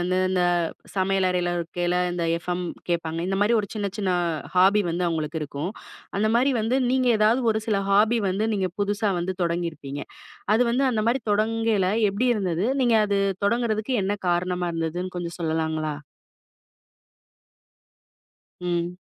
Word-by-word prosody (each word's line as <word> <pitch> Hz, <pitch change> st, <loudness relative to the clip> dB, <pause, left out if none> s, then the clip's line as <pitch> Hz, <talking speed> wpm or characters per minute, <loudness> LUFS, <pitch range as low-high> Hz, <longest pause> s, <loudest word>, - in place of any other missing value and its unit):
வந்து 180 Hz, +1 st, 0 dB
இந்த 185 Hz, -1 st, +1 dB, 0.5 s
சமையல் 190 Hz, 0 st, +2 dB
அறைல 175 Hz, -1 st, 0 dB
இருக்கைல 175 Hz, +1 st, -1 dB, 0.2 s
இந்த 175 Hz, -1 st, -2 dB, 0.2 s
FM 180 Hz, 0 st, -2 dB, 0.3 s
கேட்பாங்க. 165 Hz, -1 st, -1 dB
இந்த 195 Hz, -, 0 dB
மாரி 220 Hz, +3 st, +3 dB
ஒரு 200 Hz, -, -6 dB
சின்ன 200 Hz, -2 st, -2 dB
சின்ன 195 Hz, -3 st, 0 dB, 0.5 s
ஹாபி 195 Hz, +3 st, +5 dB
வந்து 175 Hz, +1 st, 0 dB
அவுங்களுக்கு 160 Hz, -1 st, -2 dB
இருக்கும். 145 Hz, +4 st, -4 dB, 0.5 s
அந்த 215 Hz, +1 st, +2 dB
மாரி 265 Hz, +3 st, +3 dB
வந்து 225 Hz, +4 st, +1 dB
நீங்க 255 Hz, -1 st, +2 dB
ஏதாவது 220 Hz, +4 st, +3 dB
ஒரு 220 Hz, -, -1 dB
சில 210 Hz, -, +2 dB
ஹாபி 215 Hz, +4 st, +4 dB
வந்து 200 Hz, +4 st, 0 dB
நீங்க 190 Hz, -2 st, -1 dB
புதுசா 205 Hz, +1 st, 0 dB
வந்து 185 Hz, +2 st, -2 dB
தொடங்கியிருப்பீங்க. 165 Hz, -5 st, -3 dB, 0.5 s
அது 230 Hz, -, +4 dB
வந்து 265 Hz, +3 st, +2 dB
அந்த 220 Hz, -, 0 dB
மாரி 255 Hz, +3 st, +1 dB
தொடங்கைல 220 Hz, -2 st, +1 dB, 0.2 s
எப்படி 230 Hz, +6 st, 0 dB
இருந்தது? 185 Hz, -2 st, -1 dB, 0.2 s
நீங்க 240 Hz, -2 st, +4 dB
அது 200 Hz, -1 st, +1 dB, 0.3 s
தொடங்குறதுக்கு 235 Hz, +2 st, 0 dB
என்ன 195 Hz, -, 0 dB, 0.2 s
காரணமா 180 Hz, 0 st, 0 dB
இருந்ததுன்னு 165 Hz, +3 st, -3 dB
கொஞ்சம் 170 Hz, -1 st, -4 dB
சொல்லலாங்களா? 160 Hz, -1 st, -1 dB, 2.7 s
ம். 175 Hz, 0 st, -2 dB
185 Hz, 145 wpm, -24 LUFS, 175-215 Hz, 2.7 s, ஹாபி